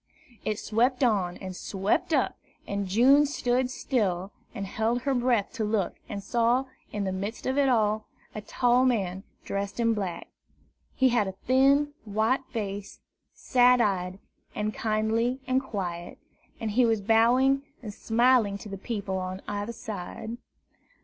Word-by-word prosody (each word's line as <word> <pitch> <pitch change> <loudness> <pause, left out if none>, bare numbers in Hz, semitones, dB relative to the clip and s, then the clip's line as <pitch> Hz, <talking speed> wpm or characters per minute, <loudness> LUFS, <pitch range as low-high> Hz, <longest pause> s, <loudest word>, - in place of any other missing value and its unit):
It 215 - -1
swept 245 +5 +1
on, 195 -7 +1
and 190 -1 -7
it - - -9
swept 195 +2 -1
up, - - +2 0.3
and 200 -1 -3
June 265 +9 +5
stood 250 -2 0
still, 200 -8 -1 0.2
and 200 - -3
held 225 +5 -1
her 275 - +1
breath 240 -5 +1
to 230 - -2
look, 210 -4 0 0.2
and 200 - -5
saw, 240 +5 +2 0.3
in 205 -1 -2
the 190 - -1
midst 200 +4 -5
of 260 - 0
it 280 -1 +3
all, 215 -3 +1 0.3
a 215 - -5
tall 245 +3 +2
man 195 -7 0 0.2
dressed 200 +3 -3
in 230 -1 +3
black. 195 -5 -4 0.7
He 260 -1 +4
had 235 -5 +2
a 190 - -4
thin, 275 +3 +4
white 220 +5 +1
face, 205 -4 -5 0.4
sad 250 0 +4
eyed 185 -4 0 0.4
and 210 0 -2
kindly 225 +3 0
and 255 +1 +1
quiet, 175 -8 -5 0.4
and 220 -2 -2
he 245 +4 +3
was 225 -2 +2
bowing 240 +6 +4 0.2
and 210 -3 -6
smiling 230 -2 +3
to 210 - -10
the 195 -1 -6
people 200 -3 -3
on 185 +1 -5
either 205 +2 -3
side. 220 +1 -6
220 Hz, 155 wpm, -27 LUFS, 200-250 Hz, 0.7 s, June